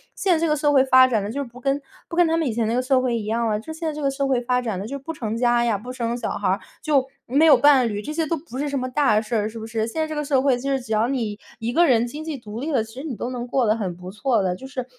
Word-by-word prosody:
现 375 Hz, -, +2 dB
在 325 Hz, -, +1 dB
这 330 Hz, -, +1 dB
个 300 Hz, -, +3 dB
社 295 Hz, -1 st, +2 dB
会 265 Hz, -2 st, +6 dB
发 260 Hz, -1 st, +6 dB
展 225 Hz, -5 st, 0 dB
得， 200 Hz, -, -4 dB
就 260 Hz, +6 st, -4 dB
是 280 Hz, -, -2 dB
不 240 Hz, +2 st, -14 dB
跟 275 Hz, +2 st, +1 dB, 0.3 s
不 335 Hz, -, -5 dB
跟 350 Hz, -1 st, +4 dB
他 325 Hz, -, +1 dB
们 325 Hz, -3 st, 0 dB
以 -, -, 0 dB
前 225 Hz, 0 st, -1 dB
那 225 Hz, -, 0 dB
个 250 Hz, -, +2 dB
社 255 Hz, +1 st, +2 dB
会 250 Hz, -2 st, 0 dB
一 215 Hz, -, -4 dB
样 230 Hz, +2 st, 0 dB
啊。 210 Hz, -1 st, 0 dB
就 230 Hz, -, -9 dB
现 320 Hz, +1 st, -4 dB
在 310 Hz, -, -1 dB
这 300 Hz, -, -6 dB
个 280 Hz, -, +1 dB
社 275 Hz, 0 st, -1 dB
会 260 Hz, -3 st, +1 dB
发 250 Hz, +1 st, +1 dB
展 220 Hz, -6 st, -3 dB
的 200 Hz, -, -5 dB
就 280 Hz, +4 st, -4 dB
不 280 Hz, +4 st, -6 dB
成 225 Hz, -7 st, -4 dB
家 240 Hz, 0 st, +3 dB
呀， 230 Hz, -3 st, +1 dB
不 245 Hz, +5 st, -8 dB
生 235 Hz, -1 st, -2 dB
小 240 Hz, -, -3 dB
孩 200 Hz, -, -2 dB
儿， 190 Hz, +2 st, +1 dB, 0.2 s
就 280 Hz, -4 st, +2 dB, 0.2 s
没 280 Hz, +6 st, +4 dB
有 305 Hz, -3 st, +8 dB
伴 265 Hz, -1 st, +5 dB
侣， 205 Hz, -2 st, -3 dB
这 295 Hz, -, -6 dB
些 320 Hz, +1 st, -1 dB
都 330 Hz, -, 0 dB
不 290 Hz, -4 st, -9 dB
是 290 Hz, +2 st, -1 dB
什 280 Hz, -1 st, -2 dB
么 255 Hz, 0 st, -3 dB
大 250 Hz, -5 st, +3 dB
事 225 Hz, +2 st, -4 dB
儿， 210 Hz, -1 st, +1 dB
是 225 Hz, +1 st, -7 dB
不 220 Hz, -, -7 dB
是？ 225 Hz, -1 st, -1 dB
现 315 Hz, +8 st, -3 dB
在 315 Hz, -, 0 dB
这 310 Hz, -, -5 dB
个 295 Hz, 0 st, -2 dB
社 275 Hz, -2 st, +2 dB
会， 265 Hz, -2 st, +2 dB
就 275 Hz, +3 st, -3 dB
是 270 Hz, -1 st, 0 dB
只 235 Hz, -2 st, -10 dB
要 215 Hz, +2 st, +2 dB
你 230 Hz, -6 st, -2 dB, 0.2 s
一 230 Hz, +1 st, -2 dB
个 345 Hz, +7 st, +4 dB
人 240 Hz, -5 st, +3 dB
经 295 Hz, +6 st, -7 dB
济 315 Hz, -3 st, -4 dB
独 220 Hz, -2 st, -8 dB
立 300 Hz, +5 st, -3 dB
了， 265 Hz, -, +2 dB
其 220 Hz, 0 st, -13 dB
实 265 Hz, +4 st, -8 dB
你 265 Hz, -, -4 dB
都 240 Hz, -, -3 dB
能 245 Hz, -1 st, -4 dB
过 255 Hz, 0 st, +1 dB
得 215 Hz, -, +3 dB
很 190 Hz, -6 st, -3 dB
不 180 Hz, 0 st, -9 dB
错 225 Hz, +2 st, +1 dB
的。 180 Hz, -1 st, 0 dB
就 265 Hz, -, -11 dB
是， 255 Hz, -2 st, -5 dB
250 Hz, 385 characters per minute, -23 LUFS, 225-285 Hz, 0.3 s, 有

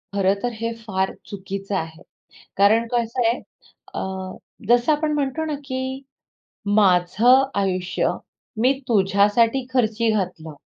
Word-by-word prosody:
खरंतर 200 Hz, +4 st, +1 dB
हे 230 Hz, 0 st, -2 dB
फार 190 Hz, -4 st, -2 dB, 0.2 s
चुकीचं 195 Hz, 0 st, -5 dB
आहे, 165 Hz, -2 st, -4 dB, 0.6 s
कारण 220 Hz, +4 st, +4 dB
कसं 235 Hz, +1 st, 0 dB
आहे 235 Hz, +2 st, +1 dB, 0.6 s
अ, -, -, -2 dB, 0.7 s
जसं 240 Hz, +5 st, +4 dB
आपण 305 Hz, 0 st, 0 dB
म्हणतो 290 Hz, +2 st, -1 dB
ना, 310 Hz, -, -3 dB
की 260 Hz, 0 st, -4 dB, 0.7 s
माझं 210 Hz, +6 st, +4 dB, 0.2 s
आयुष्य 185 Hz, -2 st, -1 dB, 0.5 s
मी 255 Hz, +3 st, +4 dB, 0.2 s
तुझ्यासाठी 210 Hz, +4 st, +2 dB
खर्ची 230 Hz, -3 st, +1 dB
घातलं 180 Hz, -7 st, -3 dB
220 Hz, 110 wpm, -22 LUFS, 195-250 Hz, 0.7 s, कारण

